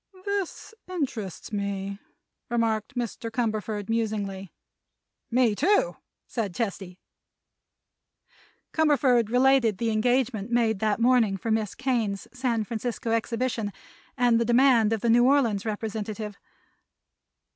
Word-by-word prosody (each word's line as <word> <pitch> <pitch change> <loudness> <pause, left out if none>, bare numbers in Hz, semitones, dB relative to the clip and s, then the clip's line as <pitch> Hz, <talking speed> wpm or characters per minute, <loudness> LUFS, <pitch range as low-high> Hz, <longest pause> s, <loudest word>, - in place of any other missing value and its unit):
"This 400 0 -3 0.2
interests 255 - -4
me," 200 -1 -3 0.5
remarked 230 0 0
Mr. 235 -1 -3
Cumberford, 215 -3 -2
musingly. 205 -4 -2 0.8
"Me, 245 -1 +3
also," 400 - +2 0.3
said 205 -7 -3
Chesty. 195 -5 -4 1.8
Cumberford 275 -8 +3
related 250 -3 +4
the 230 +1 0
engagement 240 -1 +1
made 230 -3 +2
that 215 +1 +1
morning 230 -5 +3
for 225 +4 -3
Miss 220 -2 0
Kane's 230 -7 -1
San 250 -4 0
Francisco 230 +1 -3
exhibition 230 -1 -1 0.5
and 240 -2 +4
the 235 - +1
demand 240 -2 +4
of 225 -2 0
the 235 - +1
New 240 +1 +5
Orleans 230 -7 +2
representative. 215 -1 -4
230 Hz, 110 wpm, -26 LUFS, 210-250 Hz, 1.8 s, New